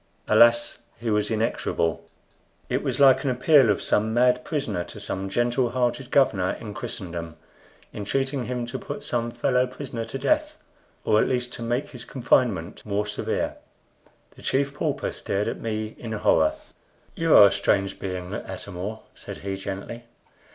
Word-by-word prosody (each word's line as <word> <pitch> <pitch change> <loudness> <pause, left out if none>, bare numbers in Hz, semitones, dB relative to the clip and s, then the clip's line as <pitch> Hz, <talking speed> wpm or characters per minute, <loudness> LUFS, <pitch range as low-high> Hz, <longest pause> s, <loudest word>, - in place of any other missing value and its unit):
Alas! 120 0 +4 0.2
he 115 -1 -2
was 105 -1 +1
inexorable. 95 -7 -1 0.7
It - - 0
was - - -2
like 135 -2 +6
an 140 - 0
appeal 130 0 +5
of 105 - +1
some 110 +2 +1
mad 125 +1 +3
prisoner 140 - -2
to - - -10
some 95 +1 -4
gentle 120 +4 +1
hearted 125 +1 -1
governor 110 -11 +3
in 105 -2 -7
Christendom, 85 -8 -5 0.6
entreating 135 +5 -1
him 125 -1 -3
to 120 - -5
put - - -6
some 120 -1 -1
fellow 125 +2 +1
prisoner 125 -3 -6
to 115 +4 -5
death, 305 - 0 0.5
or 105 - +4
at - - +1
least 125 -1 -1
to - - -7
make 120 +5 -1
his 125 -3 -8
confinement 115 -9 0
more 105 0 -1
severe. 105 - -2 0.8
The - - -16
Chief 140 +1 0
Pauper 145 - -2
stared 100 +1 -2
at - - -3
me 110 -1 -3
in 115 -2 -5
horror. 80 -7 +3 0.6
"You 165 -1 +3
are 100 - +10
a 100 - +5
strange 95 0 0
being, 90 -2 -5
Atam 90 - -6
or," 105 +5 -5
said - - -9
he, 100 0 -4
gently. 100 +5 -6
115 Hz, 165 wpm, -25 LUFS, 100-130 Hz, 0.8 s, are